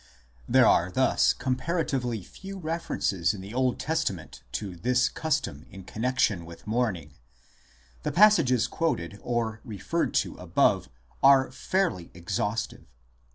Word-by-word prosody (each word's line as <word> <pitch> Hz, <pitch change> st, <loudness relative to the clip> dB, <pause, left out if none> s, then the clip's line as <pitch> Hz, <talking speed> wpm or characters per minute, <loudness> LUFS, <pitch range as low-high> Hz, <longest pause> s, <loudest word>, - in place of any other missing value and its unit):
There 130 Hz, -1 st, +6 dB
are 90 Hz, -4 st, +4 dB
thus 130 Hz, +8 st, +3 dB
comparatively 130 Hz, -, -2 dB
few 195 Hz, -, -10 dB
references 155 Hz, -, -1 dB
in 95 Hz, -, -8 dB
the 100 Hz, +3 st, -9 dB
Old 130 Hz, 0 st, 0 dB
Testament 120 Hz, -, -3 dB
to 100 Hz, -4 st, -4 dB
this 125 Hz, +7 st, +2 dB
custom 140 Hz, -, -2 dB
in 95 Hz, -2 st, -11 dB
connexion 110 Hz, -3 st, 0 dB
with 85 Hz, 0 st, -12 dB
mourning; 105 Hz, -10 st, -1 dB, 0.9 s
the -, -, -2 dB
passages 165 Hz, -, +5 dB
quoted 100 Hz, -, -2 dB
or 115 Hz, -2 st, -2 dB
referred 105 Hz, -7 st, -2 dB
to -, -, -9 dB
above -, -, +1 dB, 0.3 s
are 135 Hz, -1 st, +6 dB
fairly 170 Hz, -, -1 dB
exhaus 105 Hz, +5 st, -1 dB
tive. -, -, -17 dB
120 Hz, 125 wpm, -27 LUFS, 95-135 Hz, 0.9 s, There